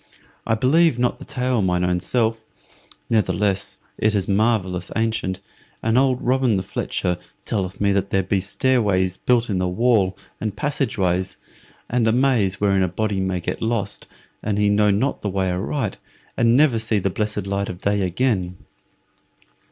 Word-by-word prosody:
I 110 - +3
believe 145 +4 +3
not 125 0 0
the - - -9
tale 125 -3 0
mine 90 -2 +1
own 90 0 +1
self; 110 +3 0 0.6
ne'theless, 100 -3 0 0.2
it 110 0 +2
is 95 -2 0
marvellous 100 -4 +1
ancient, 110 -5 -1 0.4
and 115 0 +1
old 130 -1 +2
Robin 125 -4 +2
the 95 - -2
Fletcher 90 -1 -2 0.3
telleth 95 -3 -2
me 100 -1 +2
that 100 0 0
there 95 0 +1
be 95 +1 0
stairways 95 -4 +1
built 120 -1 +2
in 95 -4 -1
the 90 - 0
wall 100 0 +2 0.2
and 105 -2 -3
passage 140 -1 -1
ways, 95 -1 0 0.5
and 120 -1 +1
a - - +4
maze 115 -6 +2
wherein 100 -2 +2
a 95 - +2
body 100 +2 -1
may 95 -1 -1
get 85 - -4
lost, 110 -3 -2 0.3
an 105 -1 -1
he 105 0 +3
know 105 0 +3
not 105 +8 0
the 105 - -2
way 95 -1 0
aright, 105 +4 -2 0.4
and 115 +1 +4
never 140 -6 +4
see 110 -1 0
the 100 -1 0
blessed 105 -1 -2
light 100 0 -2
of 90 - -6
day 100 +1 0
again." 90 -1 0
105 Hz, 170 wpm, -22 LUFS, 95-115 Hz, 0.6 s, a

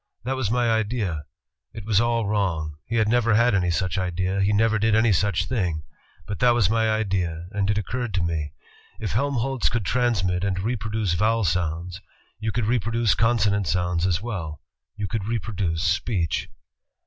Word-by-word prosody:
That 130 +3 -1
was 130 -6 -1
my 120 +1 +1
idea. 105 - -1 0.5
It 110 -3 -8
was 105 -1 +3
all 115 -1 +1
wrong. 85 -7 -1
He 115 - -2
never 115 0 +2
had 120 +1 +4
any 90 -3 +2
such 85 +2 0
idea, 95 +2 -1
he 100 +1 +2
never 110 +1 +3
did 110 0 +3
any 110 0 +4
such 95 -1 +1
thing, 90 -10 -1 0.4
but 100 -3 -5
that 120 -1 +4
was 110 -5 +3
my 110 0 +2
idea, 95 -6 -1
and 100 -1 -1
it 105 - +2
occurred 120 +3 -2
to 90 - +1
me: 80 -4 -2 0.2
* - - -27
If 105 - -3
Helmholtz 135 0 0
could 115 -3 -2
transmit 100 -8 +1
and 95 -2 0
reproduce 110 -2 -1
vowel 110 +5 +2
sounds, 85 +1 -1 0.4
you 110 0 -2
could 120 +1 -1
reproduce 115 -1 +1
consonant 105 -4 +2
sounds 90 0 +1
as 90 +1 0
well; 90 -10 -5 0.3
you 105 -2 -3
could 105 -1 -3
reproduce 100 -7 -2
speech.' 90 - 0
105 Hz, 175 wpm, -24 LUFS, 90-115 Hz, 0.5 s, had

